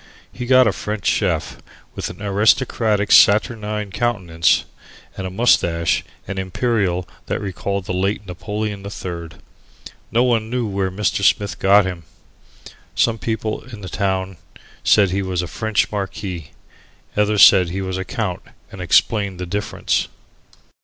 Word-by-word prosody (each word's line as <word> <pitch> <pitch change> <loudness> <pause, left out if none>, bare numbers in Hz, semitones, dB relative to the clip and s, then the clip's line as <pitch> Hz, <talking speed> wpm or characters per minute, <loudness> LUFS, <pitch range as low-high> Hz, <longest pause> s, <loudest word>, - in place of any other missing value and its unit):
He 125 -1 -6
got 130 0 +6
a 110 - +3
French 105 0 -5
Chief - - 0 0.4
with - - -4
an 100 - -10
aristocratic 105 +1 +2
saturnine 105 -1 +4
countenance, 95 -7 +1 0.5
and 95 - -4
a - - -5
moustache 85 -5 +2 0.2
and 95 0 -4
imperial 95 -2 -1 0.2
that - - -2
recalled 100 -1 -3
the 90 - -3
late 95 +3 -1
Napoleon 105 +2 -4
III. 85 -5 -7 0.7
No 120 +2 +3
one 115 -3 +1
knew 125 0 -1
where 100 -2 -1
Mr. 100 +1 -1
Smith 100 +1 +2
got 100 +1 +5
him. 90 -2 -4 0.9
Some 115 -1 +2
people 110 -1 -3
in 115 -5 -10
the 95 - -7
town 95 -1 -2 0.5
said 100 -4 +4
he 100 +1 0
was 90 -2 -2
a - - -5
French 105 +2 -1
marquis. 95 -6 -5 0.7
Others 105 0 +4
said 90 -3 +5
he 95 +3 -3
was 95 0 -3
a - - -2
count 95 -2 -3 0.3
and - - -9
explained 100 -5 +2
the 90 - -3
difference. 100 +4 -1
100 Hz, 145 wpm, -20 LUFS, 95-110 Hz, 0.9 s, got